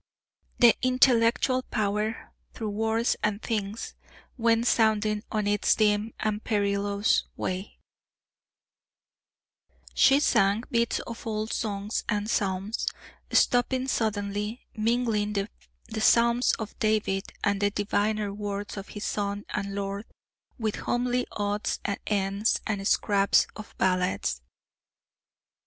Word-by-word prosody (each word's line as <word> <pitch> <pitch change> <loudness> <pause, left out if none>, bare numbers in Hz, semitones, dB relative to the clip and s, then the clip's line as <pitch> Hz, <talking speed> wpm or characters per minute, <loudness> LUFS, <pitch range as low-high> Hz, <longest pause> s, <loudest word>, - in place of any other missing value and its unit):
"The 240 -2 +7
intellectual 255 0 +3
power, 215 -1 -2 0.2
through 220 -2 -3
words 225 +2 +1
and 210 -1 0
things, 215 -1 -3 0.4
Went 230 -1 +2
sounding 215 -2 +2
on 215 -2 0
its 205 0 +2
dim 210 0 +1
and 215 0 -1
perilous 200 -1 +1
way;" 185 +2 -4 2.2
she 270 +1 +5
sang 210 -6 +3
bits 235 -1 +1
of 230 0 -8
old 215 0 -2
songs 205 -1 -2
and 210 -1 0
psalms, 200 0 -1 0.4
stopping 255 +1 +2
suddenly, 210 -1 -2
mingling 220 -2 0
the 215 +2 -6
Psalms 235 +2 +4
of 220 -1 -5
David, 215 -3 0
and 205 -1 +1
the 205 - +3
diviner 205 0 -1
words 205 0 -5
of 195 - -6
his 210 - -7
Son 205 0 -2
and 200 -1 -3
Lord, 200 +1 -3 0.5
with 220 -4 -2
homely 245 +1 0
odds 205 0 -1
and 200 - -1
ends 200 +1 +1
and 200 -2 -2
scraps 200 -2 +3
of 215 - -10
ballads. 180 - 0
210 Hz, 110 wpm, -27 LUFS, 200-230 Hz, 2.2 s, The